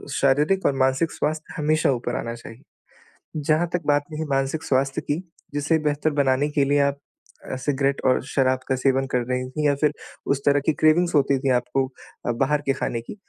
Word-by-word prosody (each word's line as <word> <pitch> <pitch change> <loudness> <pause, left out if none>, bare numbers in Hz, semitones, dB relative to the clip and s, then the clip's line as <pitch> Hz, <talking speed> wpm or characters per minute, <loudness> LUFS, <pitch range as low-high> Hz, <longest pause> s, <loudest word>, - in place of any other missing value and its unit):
शारीरिक 150 +8 +2
और 140 - +3
मानसिक 130 +5 +2
स्वास्थ्य 155 +1 -3
हमेशा 155 -1 +2
ऊपर 120 -1 -2
आना 115 - -4
चाहिए। 115 +2 -12 0.8
जहाँ 155 +3 +1
तक 175 - 0
बात 145 0 +3
रही 155 +1 -3
मानसिक 135 +3 0
स्वास्थ्य 135 0 0
की, 145 - -2 0.4
जिसे 145 +3 +1
बेहतर 150 0 0
बनाने 140 0 +2
के 140 - +4
लिए 145 +1 +2
आप 140 0 +1 0.5
अ, - - -2
सिगरेट 140 +1 0
और 130 - +3
शराब 130 -2 +1
का 130 - +1
सेवन 135 +1 +1
कर 125 - +2
रही 125 0 -1
थी 150 +2 -1
या 140 - +3
फिर 150 +1 +1 0.3
उस 140 0 0
तरह 145 0 +4
की 160 - +3
क्रेविंग्स 160 +3 +3
होती 140 -1 +3
थी 135 0 -1
आपको 125 +2 -1 0.4
अ, 120 - +2
बाहर 140 +5 +1
के 135 - +3
खाने 115 -3 -3
की। 120 - -9
140 Hz, 200 wpm, -23 LUFS, 130-150 Hz, 0.8 s, के